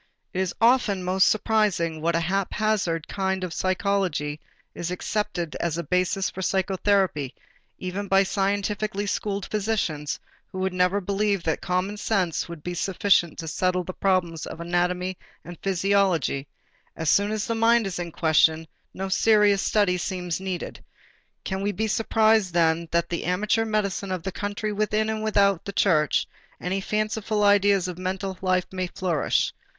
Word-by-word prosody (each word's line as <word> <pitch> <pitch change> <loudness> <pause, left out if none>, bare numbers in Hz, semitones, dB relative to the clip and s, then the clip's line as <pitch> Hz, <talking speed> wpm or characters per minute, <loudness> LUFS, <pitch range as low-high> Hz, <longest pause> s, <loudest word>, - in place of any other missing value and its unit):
It 185 - -2
is 185 -2 -2
often 230 -5 +3
most 185 +1 +3
surprising 200 -7 +1
what 165 +1 +1
a - - +3
haphazard 195 -2 0
kind 190 -1 -2
of 180 -2 -4
psychology 185 -6 -1 0.3
is 175 - -4
accepted 180 -2 -2
as 170 -2 -2
a 170 - -2
basis 180 +4 +1
for 190 - -6
psychotherapy 190 -6 +1 0.4
even 185 +2 -4
by 195 0 +4
scientifically 200 +1 -1
schooled 200 -1 -2
physicians 195 -9 -2 0.3
who - - -9
would 190 0 -1
never 180 +2 +2
believe 200 0 0
that 160 - -1
common 185 +3 -1
sense 190 -6 0
would 170 -3 -9
be 175 - -3
sufficient 185 -1 +2
to 165 - -6
settle 180 +3 0
the 185 - -6
problems 175 -5 0
of - - -8
anatomy 180 +2 -1 0.3
and 175 0 -9
physiology; 190 -7 +1 0.5
as 160 - -4
soon 200 +6 +4
as 215 -1 -1
the 230 - -1
mind 230 0 +3
is 190 -2 -4
in 170 -1 -4
question, 160 0 +3 0.3
no 195 +1 -3
serious 205 0 +4
study 200 -4 +2
seems 180 -2 -3
needed. 190 -2 -5 0.6
Can 190 0 -3
we 205 +1 0
be 215 +3 -2
surprised 220 -3 +2
then 165 0 +2
that 170 0 +2
in 170 - 0
the - - -6
amateur 210 +5 +1
medicine 200 -3 -1
of 185 -3 -3
the 190 - -3
country 205 +2 -3
within 215 +1 0
and 220 0 -3
without 200 -4 +2
the 200 - -5
church 160 -7 +2 0.3
any 190 +2 -2
fanciful 215 +1 -1
idea 205 0 +5
of 180 -1 -4
mental 190 +1 -3
life 185 -1 +1
may 185 -1 -2
flourish? 175 -3 0
190 Hz, 160 wpm, -25 LUFS, 175-205 Hz, 0.6 s, idea